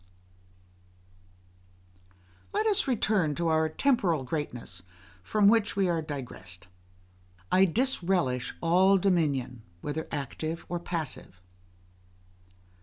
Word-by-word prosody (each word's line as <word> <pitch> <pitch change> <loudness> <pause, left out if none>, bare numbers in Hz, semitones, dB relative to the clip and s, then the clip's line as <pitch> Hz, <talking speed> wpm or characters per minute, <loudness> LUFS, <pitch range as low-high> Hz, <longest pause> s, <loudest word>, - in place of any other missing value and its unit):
Let 425 +1 +1
us 420 -8 +2
return 205 - +1
to 170 +1 0
our 160 0 +2
temporal 180 - +1
greatness, 125 - -4 0.4
from 205 - +2
which 220 0 +3
we 195 -2 +2
are 165 -2 +1
digressed. 125 - -7 0.8
I 190 +1 +6
disrelish 180 - 0
all 185 +4 +5
dominion, 150 - 0 0.2
whether 150 +2 -4
active 155 +4 -4
or 175 - -2
passive. 160 - -5
165 Hz, 95 wpm, -28 LUFS, 145-195 Hz, 0.8 s, I